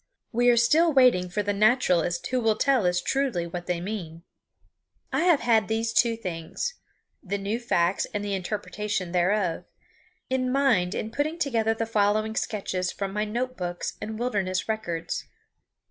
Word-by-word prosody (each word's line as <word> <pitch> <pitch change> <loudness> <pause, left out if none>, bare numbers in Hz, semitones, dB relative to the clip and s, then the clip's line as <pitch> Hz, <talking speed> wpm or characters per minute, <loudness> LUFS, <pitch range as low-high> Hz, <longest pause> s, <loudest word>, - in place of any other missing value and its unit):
We 245 +1 +3
are 240 - +5
still 315 +8 +4
waiting 250 -10 +4
for 205 +4 -1
the 205 0 0
naturalist 200 -6 +2
who 255 -1 0
will 220 -2 +2
tell 255 -4 +2
us 180 0 +2
truly 260 -5 0
what 175 +1 -6
they 180 -1 -1
mean. 170 -4 -6 0.9
I 340 - +2
have 340 -5 +4
had 225 -4 +3
these 225 +1 -1
two 230 -1 +3
things 180 - -4 0.5
the 200 0 -3
new 200 +4 -2
facts 180 -6 +1
and 205 -2 -3
the 200 - -2
interpretation 195 0 -3
thereof 180 0 +1 0.6
in 255 -1 0
mind 250 -10 +2
in 220 - -3
putting 305 +6 -1
together 225 -7 +1
the 225 - -1
following 215 0 +1
sketches 185 -5 -2
from 195 -1 -4
my 210 +1 0
note 250 +4 -3
books 175 -3 -4
and 220 0 -5
wilderness 200 -6 -1
records. 175 -7 -3
215 Hz, 160 wpm, -26 LUFS, 180-240 Hz, 0.9 s, are